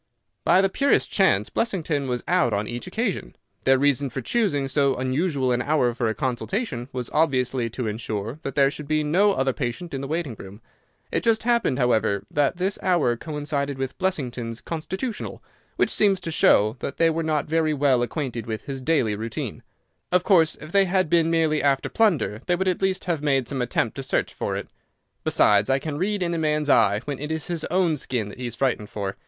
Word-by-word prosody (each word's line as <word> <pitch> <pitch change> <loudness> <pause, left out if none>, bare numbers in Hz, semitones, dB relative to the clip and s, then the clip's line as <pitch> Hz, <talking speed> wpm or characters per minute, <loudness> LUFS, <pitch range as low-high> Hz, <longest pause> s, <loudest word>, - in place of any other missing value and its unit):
"By 185 - +5
the 195 - +3
purest 275 +8 +1
chance - - +2
Blessington 160 - -1
was 125 -1 -2
out 175 -10 +2
on 100 +1 -1
each 120 +5 -5
occasion. 195 - -3 0.3
Their 135 0 +5
reason 140 0 +2
for 130 - -5
choosing 145 - 0
so 135 0 +2
unusual 130 +1 0
an 120 0 +1
hour 130 -4 +1
for 115 0 -1
a 110 - -1
consultation 135 - -3
was 125 -2 -4
obviously 130 -6 +1
to 120 +2 -4
insure 110 +3 -4
that 135 - -5
there 140 -1 +4
should 150 0 -8
be 155 0 +1
no 190 +7 +3
other 135 -6 0
patient 140 +7 -4
in 135 - -3
the 135 - -4
waiting 155 -3 -2
room. 100 +2 -10 0.5
It - - 0
just 225 -2 +2
happened, 235 - +2
however, 110 -6 +1
that 145 +3 +1
this 190 +2 -1
hour 170 -10 +2
coincided 145 0 -3
with 135 0 -4
Blessington's 125 -11 -2
constitutional, 190 +8 -5 0.3
which - - +1
seems 200 -3 +3
to 165 - -4
show 110 -6 +4
that 140 - -5
they 165 0 +4
were 165 +1 -1
not 155 -2 0
very 155 -1 +1
well 135 -3 +3
acquainted 120 -3 -3
with 110 -1 -4
his 135 -2 -6
daily 130 -8 +1
routine. 110 +2 -5 0.5
Of 180 0 +3
course, 165 -6 +4
if 155 - -11
they 195 0 +4
had 185 -3 +1
been 165 -1 +4
merely 160 -2 +2
after 140 -1 +1
plunder 170 - +1
they 175 - +3
would 190 +1 -1
at 185 0 0
least 190 -1 0
have 170 -5 -1
made 135 -4 +1
some 135 -2 -2
attempt 120 -2 -1
to - - -3
search 135 - -1
for - - -3
it. - - -5 0.6
Besides, 105 0 +3
I 135 - +4
can 145 +1 -4
read 200 +1 0
in 170 -1 -1
a 165 - -1
man's 150 -2 +1
eye 100 +1 +4
when 145 -2 -4
it 150 +2 -4
is 160 -1 -2
his 170 -2 -2
own 175 -3 +1
skin 120 -6 -2
that 105 - -11
he 125 - -3
is 120 - -6
frightened 120 -6 -1
for. 100 -2 -4
145 Hz, 210 wpm, -24 LUFS, 125-170 Hz, 0.6 s, By